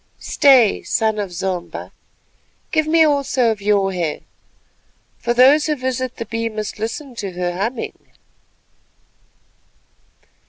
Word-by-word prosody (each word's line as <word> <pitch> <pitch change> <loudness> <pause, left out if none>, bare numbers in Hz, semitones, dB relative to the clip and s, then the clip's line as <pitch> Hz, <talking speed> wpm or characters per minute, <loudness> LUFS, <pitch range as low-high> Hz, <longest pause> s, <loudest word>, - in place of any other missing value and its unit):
Stay—son 225 -5 +3
of 200 -3 -3
Zomba, 180 0 -4 0.8
give 315 -1 +1
me 325 +1 +5
also 275 -5 +2
of 215 -2 -5
your 200 -1 +1
hair, 170 -4 -2 1.0
for 240 - -2
those 270 +6 +5
who 305 - +1
visit 255 -1 -3
the 230 - -5
Bee 230 +1 -3
must 215 -1 -6
listen 245 +5 -5
to 200 -5 -6
her 175 0 -2
humming." 225 +6 -4
230 Hz, 115 wpm, -19 LUFS, 200-265 Hz, 1.0 s, me